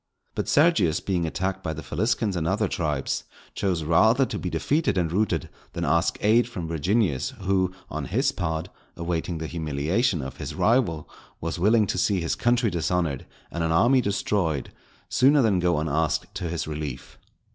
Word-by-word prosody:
But - - -3
Sergius 145 - +3
being 90 -4 -1
attacked 95 +3 -2
by 80 -4 -3
the 80 - -7
Faliscans 105 +2 0
and 80 -2 -1
other 105 +3 +1
tribes, 75 -7 -2 0.3
chose 90 -5 -1
rather 110 - +4
to - - -5
be - - -3
defeated 145 -9 0
and 85 -3 0
routed 90 -4 0 0.3
than - - -2
ask 85 0 +1
aid 115 +3 +4
from 90 -9 -5
Virginius, 85 - 0
who, 95 -1 +1 0.2
on - - -4
his - - +1
part, 80 0 -3 0.3
awaiting 85 0 -2
the 80 - -4
humiliation 80 - -1
of 65 - -7
his - - -6
rival, 110 - +1 0.3
was 80 +2 -4
willing 105 +4 +4
to - - -2
see 100 -3 +2
his 85 -1 -1
country 120 -2 +1
dishonoured 85 -4 -1 0.2
and 85 - -2
an 80 - 0
army 120 +10 +4
destroyed, 95 - -1 0.4
sooner 135 +2 +4
than 100 -5 +3
go 90 -2 +2
unasked 80 -1 -1
to 85 - -4
his 85 0 -3
relief. 75 -4 -6
90 Hz, 170 wpm, -25 LUFS, 80-105 Hz, 0.4 s, rather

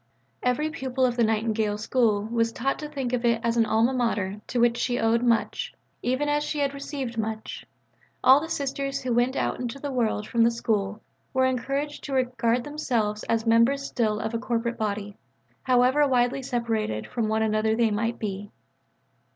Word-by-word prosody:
Every 295 +5 0
pupil 265 -4 -1
of 245 -1 0
the 240 - +2
Nightingale 220 -1 0
School 215 -2 +1
was 230 +1 0
taught 265 +4 -1
to 300 0 -6
think 270 -4 -3
of 245 -1 0
it 235 -1 +3
as 230 0 +1
an 230 -2 +3
Alma 225 +4 +2
Mater 210 -5 -1
to 245 - -1
which 235 0 +3
she 245 -1 0
owed 225 +1 +2
much, 245 - 0 0.3
even 260 +4 0
as 295 0 +1
she 300 - -3
had 280 -1 0
received 275 -4 -5
much; 220 0 -4 0.6
all 265 +2 +8
the 325 - -5
Sisters 275 -1 -2
who 250 -2 0
went 245 +3 +2
out - - -1
into 245 +1 -4
the 285 0 -5
world 225 -4 0
from 235 - +1
the 230 - +5
School 215 -3 -2 0.3
were 260 0 +4
encouraged 275 +3 -2
to 280 - -5
regard 245 -2 +1
themselves 235 -8 -1
as 230 0 0
members 230 +5 +4
still 215 -5 0
of 220 - -3
a 230 - -1
corporate 235 -1 -2
body, 205 -1 -3 0.4
however 255 +3 +4
widely 250 0 +2
separated 225 - -2
from 230 -3 -2
one 220 +1 +1
another 220 0 +1
they 230 -1 +2
might 225 +3 -1
be. 205 -1 -4
235 Hz, 185 wpm, -26 LUFS, 220-260 Hz, 0.6 s, all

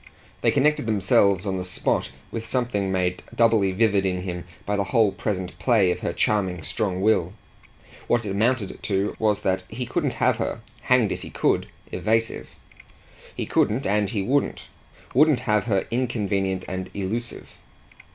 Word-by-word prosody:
They - - +3
connected 145 -3 +2
themselves 100 -2 +3
on 95 -2 -1
the - - -3
spot 90 - -1 0.2
with 115 - -4
something 110 -4 -1
made 90 -1 0
doubly 110 -4 +4
vivid 100 0 +2
in 90 -1 -1
him 90 -2 -5 0.2
by 105 - 0
the 100 -1 0
whole 110 0 +3
present 95 -2 -4
play 110 -8 +3
of - - -2
her - - -2
charming 95 -6 0
strong 95 +2 -2
will. 100 -4 +2 0.7
What 120 -1 +1
it 100 - -3
amounted 110 +1 0
to 100 0 -1
was 105 -2 +1
that 95 -1 0
he 125 +3 -4
couldn't 145 -4 -1
have 125 0 +2
her 115 0 -3 0.2
hanged 125 -5 +3
if - - -3
he - - -8
could! - - +1 0.2
evasive. 115 +2 -1 0.8
He - - -3
couldn't 120 +6 +1
and 100 0 +1
he 100 -3 -1
wouldn't 140 +8 0 0.4
wouldn't 150 +1 +4
have 105 -4 +1
her 100 -5 +1
inconvenient 100 -6 -1
and 95 0 -4
elusive. 110 +5 -4
105 Hz, 160 wpm, -24 LUFS, 95-115 Hz, 0.8 s, doubly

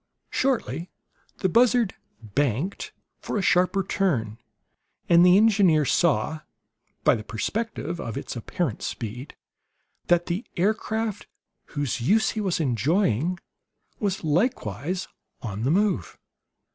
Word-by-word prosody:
Shortly 185 - -1 0.5
the - - +3
buzzard 235 0 +3 0.3
"banked" 145 - -1 0.3
for - - -3
a 200 - 0
sharper 185 +2 +3
turn; 125 - -1 0.7
and 170 0 +6
the 180 +1 +7
engineer 200 -8 +4
saw, 155 -1 +1 0.6
by - - +5
the 110 - -3
perspective 175 - -3
of 115 - -5
its - - -5
apparent 125 - -3
speed, 120 +5 -6 0.7
that 175 0 +3
the 180 +7 -2
aircraft 215 +2 -1 0.5
whose 140 -4 -1
use 215 - +3
he 220 - -3
was 190 -5 0
enjoying 155 - +1 0.6
was 195 -4 -1
likewise 160 - -1 0.4
on 105 -3 -4
the - - +2
move. 190 - +1
175 Hz, 115 wpm, -25 LUFS, 130-200 Hz, 0.7 s, the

